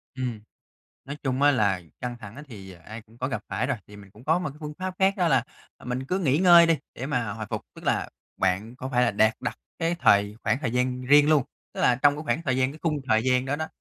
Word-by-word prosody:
Ừm, 125 Hz, -4 st, -3 dB, 0.7 s
nói 140 Hz, +2 st, -6 dB
chung 135 Hz, 0 st, -1 dB
á 145 Hz, -, +6 dB
là 100 Hz, -8 st, +1 dB, 0.2 s
căng 125 Hz, -1 st, -4 dB
thẳng 105 Hz, +1 st, -11 dB
á 150 Hz, -, -8 dB
thì 95 Hz, -5 st, -10 dB
ai 105 Hz, +7 st, -11 dB
cũng 115 Hz, +1 st, -22 dB
có 130 Hz, -, -2 dB
gặp 110 Hz, -6 st, -4 dB
phải -, -, -1 dB
rồi, -, -, -1 dB
thì 105 Hz, -, -13 dB
mình 100 Hz, -2 st, -14 dB
cũng 110 Hz, +5 st, -17 dB
có 160 Hz, +3 st, +3 dB
một 180 Hz, -4 st, -3 dB
cái 140 Hz, -, -14 dB
phương 150 Hz, -1 st, -6 dB
pháp 185 Hz, 0 st, -4 dB
khác 195 Hz, +1 st, +3 dB
đó 180 Hz, -3 st, +2 dB
là, 135 Hz, -5 st, +3 dB, 0.3 s
ờ, -, -, -17 dB
mình 125 Hz, +1 st, -3 dB
cứ 180 Hz, +8 st, -1 dB
nghỉ 145 Hz, -6 st, +2 dB
ngơi 175 Hz, -2 st, +7 dB
đi 165 Hz, -1 st, +3 dB, 0.2 s
để 130 Hz, -, -5 dB
mà 120 Hz, -7 st, -1 dB
hồi 110 Hz, 0 st, -6 dB
phục. -, -, -2 dB
Tức -, -, -13 dB
là -, -, 0 dB, 0.3 s
bạn 95 Hz, +6 st, -1 dB
có 130 Hz, 0 st, -6 dB
phải 125 Hz, -2 st, +2 dB
là 120 Hz, -, +3 dB
đạt 110 Hz, +2 st, +3 dB
đặt -, -, -3 dB, 0.2 s
cái 165 Hz, 0 st, 0 dB
thời 100 Hz, +1 st, +4 dB
khoảng 135 Hz, -, +1 dB
thời 125 Hz, -5 st, -1 dB
gian 125 Hz, 0 st, 0 dB
riêng 145 Hz, +3 st, +5 dB
luôn, 155 Hz, -3 st, +4 dB, 0.3 s
tức -, -, -5 dB
là 125 Hz, -, +4 dB
trong 145 Hz, +2 st, +3 dB
cái 150 Hz, -, -5 dB
khoảng 160 Hz, -, -1 dB
thời 130 Hz, -5 st, 0 dB
gian, 130 Hz, +1 st, +1 dB
cái 155 Hz, -, -12 dB
khung 155 Hz, -3 st, 0 dB
thời 110 Hz, 0 st, +3 dB
gian 125 Hz, 0 st, +2 dB
đó 140 Hz, +2 st, -1 dB
đó 160 Hz, +1 st, -3 dB
130 Hz, 280 wpm, -26 LUFS, 110-150 Hz, 0.7 s, ngơi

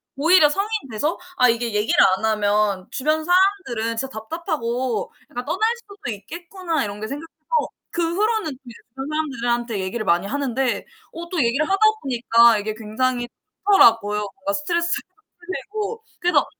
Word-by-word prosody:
오히려 310 Hz, +1 st, +5 dB
성인 395 Hz, +7 st, -1 dB, 0.2 s
돼서 295 Hz, +10 st, -1 dB, 0.2 s
'아 250 Hz, -, +6 dB
이게 230 Hz, -1 st, 0 dB
얘기를 210 Hz, +1 st, +1 dB, 0.2 s
안 220 Hz, -, -3 dB
하면 205 Hz, -3 st, +1 dB
주변 310 Hz, +3 st, 0 dB
사람들은 350 Hz, -, +1 dB
진짜 270 Hz, +3 st, -2 dB
답답하고 245 Hz, -, -3 dB, 0.2 s
약간 245 Hz, +1 st, -5 dB
떠날 435 Hz, +4 st, +1 dB
수도 405 Hz, -, -9 dB
있겠구나.' 335 Hz, -, -4 dB
이런 205 Hz, 0 st, -6 dB
게 215 Hz, -, -4 dB
생겨서 290 Hz, +6 st, -6 dB, 0.6 s
그 335 Hz, -1 st, -1 dB
후로는 430 Hz, -4 st, +1 dB
이제 240 Hz, -, -10 dB, 0.2 s
주변 270 Hz, +3 st, -7 dB
사람들한테 240 Hz, -7 st, -1 dB
얘기를 215 Hz, +4 st, -3 dB
많이 175 Hz, +1 st, +2 dB
하는데 265 Hz, -1 st, -1 dB, 0.3 s
어 340 Hz, +1 st, -7 dB
또 365 Hz, -, -4 dB
얘기를 265 Hz, +6 st, +1 dB
하다 390 Hz, -, +2 dB, 0.2 s
보니까 235 Hz, -3 st, +4 dB
이게 210 Hz, +1 st, -3 dB
굉장히 240 Hz, +3 st, -1 dB, 0.4 s
좋더라고요. 225 Hz, -, +5 dB, 0.2 s
뭔가 290 Hz, +3 st, -3 dB
스트레스도 340 Hz, +3 st, 0 dB, 0.4 s
풀리고. 410 Hz, -, -5 dB, 0.2 s
그래서 355 Hz, 0 st, +3 dB
260 Hz, 355 characters per minute, -22 LUFS, 225-340 Hz, 0.6 s, 아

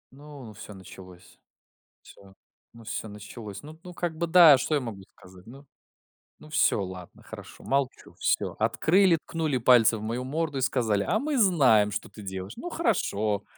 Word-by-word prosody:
Ну, 145 Hz, -1 st, -12 dB
ну, 110 Hz, -, -11 dB
всё 105 Hz, +1 st, -11 dB
началось. 90 Hz, -1 st, -14 dB, 0.6 s
Всё. 95 Hz, -1 st, -17 dB, 0.4 s
Ну, 115 Hz, -1 st, -14 dB
всё 110 Hz, -, -5 dB
началось. 105 Hz, +2 st, -10 dB
Ну 155 Hz, +2 st, -12 dB
ну, 180 Hz, -1 st, -10 dB
как 170 Hz, -2 st, -3 dB
бы, 170 Hz, +1 st, -2 dB
да, 165 Hz, -3 st, +8 dB
а -, -, +5 dB
что 155 Hz, -, -1 dB
я -, -, +2 dB
могу 110 Hz, -5 st, -7 dB, 0.2 s
сказать, 90 Hz, +2 st, -17 dB
ну? 135 Hz, +4 st, -13 dB, 0.7 s
Ну, 155 Hz, -, -16 dB
всё, 100 Hz, -, +2 dB
ладно, 90 Hz, -1 st, -10 dB
хорошо, -, -, -12 dB
молчу, 135 Hz, -1 st, -2 dB
всё. -, -, 0 dB
Открыли, 165 Hz, -, +3 dB
ткнули 155 Hz, -5 st, -2 dB
пальцы 120 Hz, -2 st, +4 dB
в -, -, -9 dB
мою 120 Hz, +3 st, -3 dB
морду 150 Hz, 0 st, -3 dB
и -, -, -4 dB
сказали: 115 Hz, -6 st, 0 dB
"А 210 Hz, -, +1 dB
мы 295 Hz, -1 st, -2 dB
знаем, 135 Hz, -, +4 dB
что 105 Hz, -, -4 dB
ты 105 Hz, -, -13 dB
делаешь". 95 Hz, +1 st, -7 dB
Ну, 350 Hz, -, -7 dB
хорошо. 110 Hz, -, -1 dB
125 Hz, 180 wpm, -26 LUFS, 105-155 Hz, 0.7 s, да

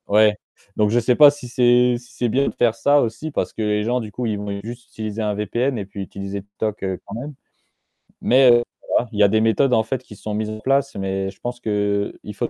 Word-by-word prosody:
Ouais, 105 Hz, +1 st, +4 dB, 0.4 s
donc 105 Hz, -1 st, +2 dB
je 120 Hz, +3 st, +3 dB
sais 120 Hz, +1 st, +2 dB
pas 145 Hz, +2 st, +9 dB
si 145 Hz, -3 st, -10 dB
c'est 125 Hz, 0 st, +4 dB
si 120 Hz, 0 st, -16 dB
c'est 120 Hz, -1 st, -1 dB
bien 135 Hz, +5 st, +1 dB
de -, -, -8 dB
faire 120 Hz, -2 st, +2 dB
ça 145 Hz, +4 st, +3 dB
aussi 120 Hz, +8 st, -3 dB
parce -, -, -2 dB
que -, -, -5 dB
les 105 Hz, -1 st, 0 dB
gens 120 Hz, +3 st, 0 dB
du 110 Hz, -3 st, -7 dB
coup 125 Hz, +4 st, -4 dB
ils 110 Hz, -2 st, -1 dB
vont 100 Hz, -1 st, -4 dB
juste 120 Hz, +2 st, -8 dB
utiliser 110 Hz, 0 st, -5 dB
un 105 Hz, -1 st, 0 dB
VPN 120 Hz, +5 st, -1 dB
et 100 Hz, -, -4 dB
puis 100 Hz, +1 st, -8 dB
utiliser 100 Hz, +1 st, -6 dB
TikTok 105 Hz, +1 st, -5 dB, 0.2 s
quand 100 Hz, -, -9 dB
même. 140 Hz, +6 st, -6 dB, 0.9 s
Mais 130 Hz, +1 st, +5 dB
heu, 120 Hz, 0 st, +5 dB, 0.3 s
voilà, 120 Hz, -, +1 dB
il 105 Hz, -, -5 dB
y -, -, +7 dB
a -, -, +7 dB
des 110 Hz, +2 st, +2 dB
méthodes 120 Hz, +4 st, +2 dB
en 110 Hz, -, +4 dB
fait 120 Hz, +3 st, -3 dB
qui 105 Hz, -, -13 dB
sont 105 Hz, +1 st, -6 dB
mises 105 Hz, 0 st, -2 dB
en 110 Hz, 0 st, -6 dB
place, 135 Hz, +3 st, 0 dB
mais 95 Hz, 0 st, -2 dB
je 95 Hz, -, -14 dB
pense 120 Hz, 0 st, -5 dB
qu'il 100 Hz, -2 st, 0 dB, 0.2 s
faut -, -, -2 dB
110 Hz, 250 wpm, -21 LUFS, 105-125 Hz, 0.9 s, pas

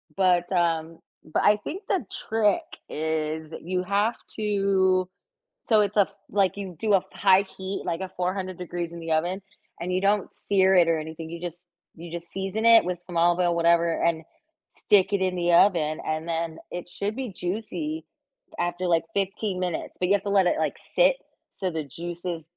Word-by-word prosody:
but, 180 Hz, -2 st, +2 dB
um, 165 Hz, -2 st, 0 dB, 0.2 s
but 155 Hz, -, -1 dB
I 210 Hz, -, +6 dB
think 365 Hz, -, -6 dB
the 360 Hz, -, 0 dB
trick 220 Hz, +7 st, +1 dB, 0.3 s
is 155 Hz, 0 st, -2 dB
you 180 Hz, +1 st, -2 dB
have 205 Hz, +4 st, +1 dB, 0.2 s
to 195 Hz, -3 st, +2 dB, 0.6 s
so 220 Hz, -3 st, +5 dB
it's 205 Hz, 0 st, -1 dB
a 205 Hz, -, +6 dB
f -, -, -2 dB
like, 200 Hz, -1 st, +1 dB
you 190 Hz, -3 st, -6 dB
do 215 Hz, -2 st, +1 dB
a -, -, +8 dB
f -, -, -5 dB
high 195 Hz, 0 st, +5 dB
heat, 190 Hz, +1 st, -4 dB
like 170 Hz, +1 st, -2 dB
a 190 Hz, -, -4 dB
400 185 Hz, 0 st, -2 dB
degrees 175 Hz, -1 st, -4 dB
in 170 Hz, -, -7 dB
the 165 Hz, 0 st, -5 dB
oven, 175 Hz, +5 st, 0 dB, 0.4 s
and 180 Hz, +2 st, -3 dB
you 185 Hz, -, +1 dB
don't 200 Hz, 0 st, +1 dB
sear 190 Hz, -1 st, +2 dB
it 175 Hz, -2 st, +6 dB
or 165 Hz, -1 st, +3 dB
anything, 160 Hz, +1 st, -7 dB
you 170 Hz, -, -6 dB
just, 175 Hz, +1 st, -7 dB, 0.3 s
you 170 Hz, 0 st, -10 dB
just 170 Hz, 0 st, -7 dB
season 195 Hz, +4 st, -3 dB
it 230 Hz, -1 st, +8 dB
with 180 Hz, -1 st, -3 dB
some 175 Hz, -2 st, -9 dB
olive 175 Hz, +1 st, +4 dB
oil, 175 Hz, -1 st, +2 dB
whatever 170 Hz, 0 st, +3 dB
and 165 Hz, -1 st, +1 dB, 0.5 s
stick 205 Hz, -1 st, +3 dB
it 195 Hz, -, +1 dB
in 185 Hz, -1 st, +1 dB
the 175 Hz, 0 st, +1 dB
oven 170 Hz, -4 st, +4 dB
and 155 Hz, +1 st, -2 dB
then 165 Hz, -1 st, -2 dB
it 175 Hz, 0 st, -6 dB
should 205 Hz, +4 st, -3 dB
be 260 Hz, -3 st, -4 dB
juicy 230 Hz, -, -4 dB, 0.6 s
after, 175 Hz, +1 st, -1 dB
like, 165 Hz, -1 st, +2 dB
15 195 Hz, -1 st, -1 dB
minutes, 180 Hz, -3 st, -3 dB
but 180 Hz, -, +1 dB
you 200 Hz, -, +4 dB
have 195 Hz, -, -1 dB
to 200 Hz, -, -3 dB
let 195 Hz, -2 st, +4 dB
it, -, -, +1 dB
like, -, -, -1 dB, 0.2 s
sit -, -, +5 dB, 0.4 s
so 190 Hz, -2 st, -2 dB
the 160 Hz, -2 st, -3 dB
juices 170 Hz, +3 st, -6 dB
180 Hz, 195 wpm, -26 LUFS, 170-200 Hz, 0.6 s, a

